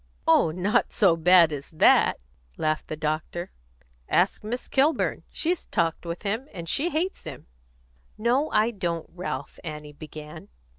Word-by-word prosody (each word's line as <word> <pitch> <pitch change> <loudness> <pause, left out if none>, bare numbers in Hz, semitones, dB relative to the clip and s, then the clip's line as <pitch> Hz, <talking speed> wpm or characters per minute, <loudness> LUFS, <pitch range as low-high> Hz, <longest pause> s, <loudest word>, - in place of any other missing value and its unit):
"Oh, 165 0 +5
not 190 +8 +1
so 195 -7 +4
bad 170 0 +6
as 145 -1 -6
that!" 160 - +4 0.4
laughed 155 0 -1
the - - -4
doctor. 155 +3 -3 0.6
"Ask 185 +4 +2
Miss 240 +4 -4
Kilburn. 285 +4 +1
She's 345 +1 -1
talked 165 +1 -1
with 170 +1 -5
him, 220 +7 -2
and 170 -2 -6
she 305 - +1
hates 355 +4 -2
him." 145 -5 -8 0.7
"No, 250 +7 +1
I 220 +2 +2
don't, 170 -6 -3
Ralph," 150 -6 -5
Annie 150 -2 -7
began. 150 0 -10
175 Hz, 145 wpm, -26 LUFS, 155-225 Hz, 0.7 s, bad